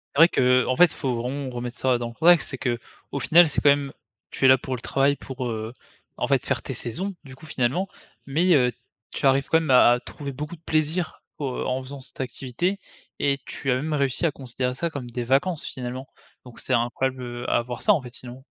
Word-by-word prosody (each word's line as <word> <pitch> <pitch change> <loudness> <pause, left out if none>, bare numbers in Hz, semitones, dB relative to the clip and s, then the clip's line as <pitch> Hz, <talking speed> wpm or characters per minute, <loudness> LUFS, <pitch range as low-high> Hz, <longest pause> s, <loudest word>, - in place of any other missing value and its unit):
C'est 140 - 0
vrai 170 - +9
que, 125 -3 +3
en 130 - 0
fait, 180 - +8
il 165 - -3
faut 130 -3 -1
vraiment 130 +3 -3
remettre 120 0 -5
ça 130 -2 +2
dans 120 -1 -4
le - - -11
contexte 165 +5 +5
c'est 135 - -4
qu'au 120 +3 -5
final, 170 +3 +6
c'est 150 - 0
quand 145 - +5
même 140 -1 +2 0.4
tu 135 - -1
es - - +9
là 130 0 +7
pour 130 +1 -4
le 125 - -9
travail 140 +1 +2
pour, 130 -2 -6
heu, 110 0 -4 0.5
en - - -1
fait - - +1
faire - - -1
tes - - -5
saisons, 185 - -3
du 130 -2 -12
coup 155 - -15
finalement. 140 +8 0 0.4
Mais, 165 +6 +2
heu, 125 -5 +4 0.4
tu - - -3
arrives 135 +1 +3
quand 160 - +4
même 160 - -4
à 125 -2 +7
à 120 - +3
trouver 140 +2 -7
beaucoup 150 +5 -6
de 160 - -23
plaisir 160 +2 -1 0.2
au 145 - -2 0.2
en 130 +1 -1
faisant 135 +1 -9
cette 130 - -7
activité. 135 +10 -2 0.4
Et 140 -1 +1
tu 135 - -3
as - - +3
même 150 +4 -2
réussi 140 +2 +1
à 160 - +2
considérer 125 -1 -3
ça 170 +6 -2
comme 135 -6 -7
des 120 0 -3
vacances 140 +7 +1
finalement. 130 +1 -6 0.4
Donc 125 - -12
c'est 130 - -1
incroyable, 130 +2 0
heu, 120 0 -5
à - - +3
avoir 120 0 -4
ça 210 - +5
en 160 - 0
fait 125 - -9
sinon. 125 +1 -10
130 Hz, 240 wpm, -24 LUFS, 125-150 Hz, 0.5 s, vrai